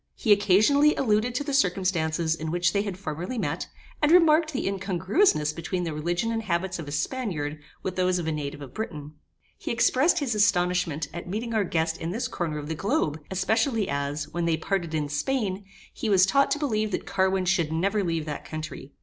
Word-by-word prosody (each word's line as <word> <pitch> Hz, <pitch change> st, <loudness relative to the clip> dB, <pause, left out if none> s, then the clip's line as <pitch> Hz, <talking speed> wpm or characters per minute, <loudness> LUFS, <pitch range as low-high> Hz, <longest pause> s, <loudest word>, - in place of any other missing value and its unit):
He 220 Hz, -, 0 dB
occasionally 215 Hz, +10 st, +4 dB
alluded 235 Hz, 0 st, +1 dB
to 290 Hz, -, 0 dB
the 285 Hz, -1 st, -4 dB
circumstances 175 Hz, -8 st, +1 dB
in 160 Hz, -1 st, -4 dB
which 175 Hz, +1 st, +1 dB
they 200 Hz, -, +2 dB
had 200 Hz, -3 st, -4 dB
formerly 180 Hz, +6 st, -5 dB
met, -, -, -2 dB, 0.3 s
and 295 Hz, 0 st, +4 dB
remarked 320 Hz, -2 st, +5 dB
the 270 Hz, -, -2 dB
incongruousness 190 Hz, -, +1 dB
between 175 Hz, +2 st, -3 dB
the 165 Hz, -2 st, -3 dB
religion 175 Hz, +8 st, -1 dB
and 225 Hz, -1 st, -1 dB
habits 185 Hz, -2 st, -2 dB
of 160 Hz, -, -6 dB
a -, -, -6 dB
Spaniard, 155 Hz, -, -2 dB, 0.2 s
with 185 Hz, -1 st, -4 dB
those 185 Hz, 0 st, +2 dB
of 175 Hz, -, -3 dB
a 160 Hz, -, 0 dB
native 145 Hz, -1 st, -4 dB
of 130 Hz, -2 st, -11 dB
Britain. 150 Hz, -9 st, -6 dB, 0.5 s
He -, -, -5 dB
expressed 260 Hz, +8 st, +3 dB
his 280 Hz, -7 st, 0 dB
astonishment 180 Hz, -6 st, +1 dB
at 170 Hz, +1 st, -7 dB
meeting 225 Hz, +4 st, -3 dB
our 215 Hz, -2 st, +2 dB
guest 160 Hz, -2 st, -1 dB
in 165 Hz, -, -4 dB
this 225 Hz, +8 st, -2 dB
corner 160 Hz, -3 st, -3 dB
of 145 Hz, -1 st, -6 dB
the 160 Hz, -, -2 dB
globe, 160 Hz, -, 0 dB
especially 220 Hz, +3 st, +1 dB
as, 140 Hz, +1 st, -2 dB
when 175 Hz, 0 st, -2 dB
they 165 Hz, -1 st, +1 dB
parted 175 Hz, -5 st, -2 dB
in 150 Hz, -2 st, -1 dB
Spain, 195 Hz, -, -2 dB, 0.3 s
he 225 Hz, -, -3 dB
was 190 Hz, -2 st, +6 dB
taught 275 Hz, +8 st, +3 dB
to 280 Hz, -, +1 dB
believe 215 Hz, -8 st, 0 dB
that 195 Hz, -, -3 dB
Carwin 190 Hz, -1 st, +1 dB
should 175 Hz, -4 st, +1 dB
never 195 Hz, +6 st, +1 dB
leave 165 Hz, -3 st, -1 dB
that 150 Hz, -2 st, -5 dB
country. 155 Hz, -3 st, -7 dB
185 Hz, 200 wpm, -26 LUFS, 160-220 Hz, 0.5 s, was